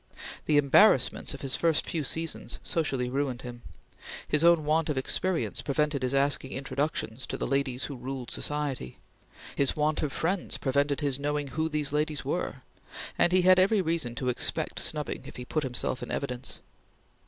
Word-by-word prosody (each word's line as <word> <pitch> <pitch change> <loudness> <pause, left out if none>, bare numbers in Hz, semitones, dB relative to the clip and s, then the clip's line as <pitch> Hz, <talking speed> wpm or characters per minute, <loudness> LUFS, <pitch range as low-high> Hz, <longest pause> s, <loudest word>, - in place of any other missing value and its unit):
The 150 - +4
embarrassments 140 -2 +4
of - - -9
his 135 -1 -1
first 165 -2 +2
few 160 -3 -1
seasons 165 +3 -2
socially 135 -6 0
ruined 130 -1 -2
him. 120 -1 -8 0.7
His 150 +1 +3
own 170 -2 +5
want 155 +1 +2
of 150 - -1
experience 175 +6 0
prevented 150 0 0
his 130 +1 0
asking 140 -1 +1
introductions 130 -2 -2
to - - -4
the - - -2
ladies 135 -1 0
who 140 - -4
ruled 125 0 -6
society; 145 - -3 0.6
his 140 -2 +2
want 155 +1 +1
of 150 - -1
friends 180 +6 -1
prevented 140 +2 +1
his 140 -2 0
knowing 145 0 -1
who 160 +4 -1
these 150 -2 -1
ladies 150 0 -1
were; - - -3 0.5
and 175 - +3
he 185 0 +4
had 185 0 +7
every 200 +3 +4
reason 160 -8 -1
to 125 +2 -1
expect 125 - 0
snubbing - - -2
if - - -10
he 125 - -6
put 155 - -1
himself 130 -1 -2
in 120 - -6
evidence. 125 -3 -3
145 Hz, 175 wpm, -28 LUFS, 130-155 Hz, 0.7 s, had